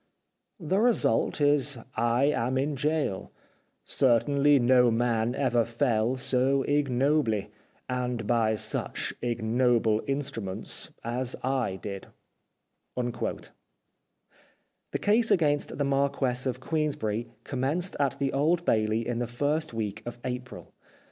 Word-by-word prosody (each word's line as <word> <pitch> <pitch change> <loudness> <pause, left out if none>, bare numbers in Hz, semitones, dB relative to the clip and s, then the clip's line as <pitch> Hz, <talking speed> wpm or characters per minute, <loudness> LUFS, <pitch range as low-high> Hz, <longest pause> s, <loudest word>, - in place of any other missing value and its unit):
The 185 +3 0
result 235 -7 +2
is 145 -2 +2 0.2
I 120 +2 +2
am 130 -3 +1
in 140 +3 0
gaol. 145 -7 -1 0.6
Certainly 140 +3 +3
no 125 -1 +5
man 115 0 +1
ever 120 -4 +2
fell 115 +1 0
so 130 +1 +1
ignobly, 135 -5 +1 0.4
and 125 -3 -2
by 110 -1 +2
such - - -2
ignoble 115 -1 +1
instruments, 135 -9 -4
as 120 +2 -2
I 130 -7 0
did." 100 0 -7 0.9
The 120 -1 -3 1.5
case 225 +3 +3
against 145 -4 +2
the 145 - 0
Marquess 135 -2 +1
of 125 -1 -2
Queensberry 130 -7 -2
commenced 145 +8 -1
at 140 -2 +1
the 140 -1 -1
Old 165 +5 +1
Bailey 110 +1 +1
in 120 -1 -2
the 120 - -1
first 145 +6 -1
week 110 -2 -4
of 120 0 -6
April. 125 0 -6
125 Hz, 115 wpm, -28 LUFS, 115-145 Hz, 1.5 s, no